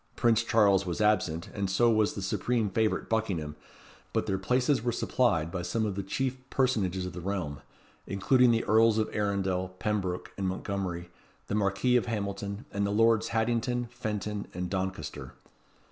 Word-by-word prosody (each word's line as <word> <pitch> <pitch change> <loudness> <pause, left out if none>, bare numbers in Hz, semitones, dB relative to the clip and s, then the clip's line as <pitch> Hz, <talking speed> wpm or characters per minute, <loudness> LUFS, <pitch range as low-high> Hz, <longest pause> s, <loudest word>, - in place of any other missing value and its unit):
Prince 115 -2 +3
Charles 105 -4 +4
was 90 -3 -3
absent, 105 -6 +1
and 100 -2 -2
so 115 +5 +4
was 110 -2 +2
the 100 - -4
supreme 110 +2 0
favourite 110 +1 0
Buckingham; 95 -10 -1 0.6
but - - +1
their 95 - -1
places 125 +6 +2
were 120 +1 0
supplied 100 -9 +1
by 90 - -3
some 110 +5 -1
of 105 - -1
the 100 - -3
chief 130 +7 -2
personages 100 -9 +1
of 90 - -6
the 90 - -6
realm, 90 -7 -3 0.5
including 125 +6 +3
the 115 -1 +2
Earls 110 +1 +4
of 110 - -1
Arundel, 95 -3 0
Pembroke, 95 -3 -2
and 95 - 0
Montgomery, 95 -2 -3 0.4
the - - -2
Marquis 105 +4 +2
of 120 - -1
Hamilton, 100 -2 -3
and 100 0 -1
the 100 - +1
Lords 115 +1 +3
Haddington, 120 +1 0
Fenton, 105 -3 -4
and 90 0 -3
Doncaster. 95 -6 -4
100 Hz, 165 wpm, -29 LUFS, 95-115 Hz, 0.6 s, Charles